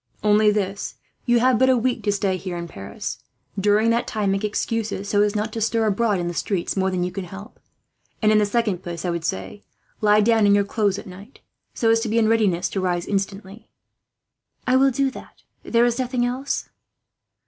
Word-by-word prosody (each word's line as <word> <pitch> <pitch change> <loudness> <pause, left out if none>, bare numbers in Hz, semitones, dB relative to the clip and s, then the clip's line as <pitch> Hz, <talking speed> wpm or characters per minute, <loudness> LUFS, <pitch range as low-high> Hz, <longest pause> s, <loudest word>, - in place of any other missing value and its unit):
"Only 210 0 +4
this. 200 -1 -2 0.3
You 240 0 +4
have 255 -2 +3
but 260 0 +4
a 260 - +4
week 250 +1 0
to 205 - +3
stay 195 -1 0
here 185 -1 -5
in 170 0 -5
Paris. 100 -10 -7 0.4
During 210 +3 +3
that 235 +1 0
time, 210 -3 -1
make 195 +1 -1
excuses 210 -1 -2
so 205 0 +2
as 210 0 +1
not 215 +1 -2
to 225 - -4
stir 225 +1 +1
abroad 215 0 +1
in 175 - -2
the 175 - -3
streets 180 0 -2
more 190 -1 +1
than 185 -1 -1
you 180 - -2
can 185 +1 -5
help; 195 +4 -11 0.6
and 215 -1 +3
in 215 - +5
the 210 - +2
second 205 -4 0
place 170 -1 -6
I 175 - 0
would 170 -1 -3
say, 95 -8 -4 0.4
lie 210 0 +5
down 220 -1 +4
in 200 - +5
your 205 - +3
clothes 200 -1 0
at - - -8
night, 195 +7 -13 0.3
so 225 -1 +2
as 225 - +4
to 225 0 -3
be 225 - 0
in 225 -1 +4
readiness 205 -6 +2
to 195 - -2
rise, 175 -2 -1
instantly." 195 +2 -4 1.0
"I 255 - +2
will 270 +1 +5
do 270 +1 0
that," - - -11
she - - -30 0.2
said. - - -10
"There 235 +1 +5
is 240 +1 0
nothing 250 -1 0
else?" 255 +3 -2
210 Hz, 225 wpm, -22 LUFS, 190-230 Hz, 1.0 s, in